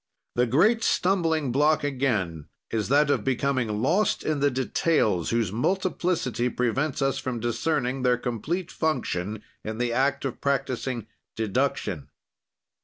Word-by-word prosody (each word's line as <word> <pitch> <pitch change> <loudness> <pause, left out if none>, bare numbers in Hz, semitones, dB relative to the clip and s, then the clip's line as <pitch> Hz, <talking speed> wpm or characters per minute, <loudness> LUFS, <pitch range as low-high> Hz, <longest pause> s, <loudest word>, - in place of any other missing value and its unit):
"The 125 0 +2
great 210 - +3
stumbling 165 -7 +1
block 150 +3 +3
again 110 - -1 0.2
is 110 -2 -1
that 145 +1 +4
of - - +1
becoming 130 -5 0
lost 180 +10 +2
in 155 -2 0
the 145 +1 +3
details 130 - +1
whose 115 -5 0
multiplicity 170 - 0
prevents 135 +4 0
us 135 0 +1
from 125 -2 -3
discerning 125 +2 -1
their 125 -1 +3
complete 135 - -3
function 110 - -2 0.2
in 110 0 -4
the 120 0 0
act 140 +2 +1
of 135 - -4
practising 130 -4 -1 0.3
deduction. 110 - -1
130 Hz, 130 wpm, -26 LUFS, 115-150 Hz, 0.3 s, that